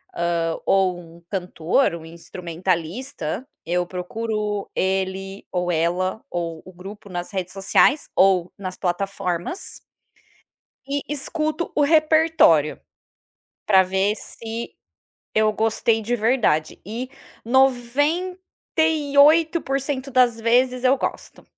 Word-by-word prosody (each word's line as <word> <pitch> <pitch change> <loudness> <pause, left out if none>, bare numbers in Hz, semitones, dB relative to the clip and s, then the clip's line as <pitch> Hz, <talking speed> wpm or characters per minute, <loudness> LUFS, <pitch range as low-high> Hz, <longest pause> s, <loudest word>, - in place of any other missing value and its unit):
hã, 170 -1 0
ou 190 -2 +2
um 170 -1 -14
cantor, 180 +2 0
um 160 -1 -9
instrumentalista. 170 - -4 0.2
Eu 175 +1 0
procuro 210 +3 -3
ele 190 +1 -2
ou 180 -1 -1
ela, 175 +5 0
ou 165 -2 -4
o 185 - -11
grupo 195 +3 -11
nas 175 +2 -5
redes 185 -2 -3
sociais 200 +9 +3
ou 185 -2 +3
nas 185 -2 -6
plataformas 180 - -3 1.1
e 285 0 -1
escuto 305 +3 -2
o 295 - +2
repertório, 310 - +4 0.9
para 190 -2 +6
ver 190 +3 +1
se 230 +1 -7 0.6
eu 215 0 +3
gostei 225 0 +1
de 240 +3 -1
verdade, 220 -9 +1
e 235 +6 -5 0.4
98% 290 +1 +2
das 245 -3 +3
vezes 250 +2 +2
eu 260 +2 +5
gosto. - - -5
210 Hz, 105 wpm, -22 LUFS, 180-265 Hz, 1.1 s, para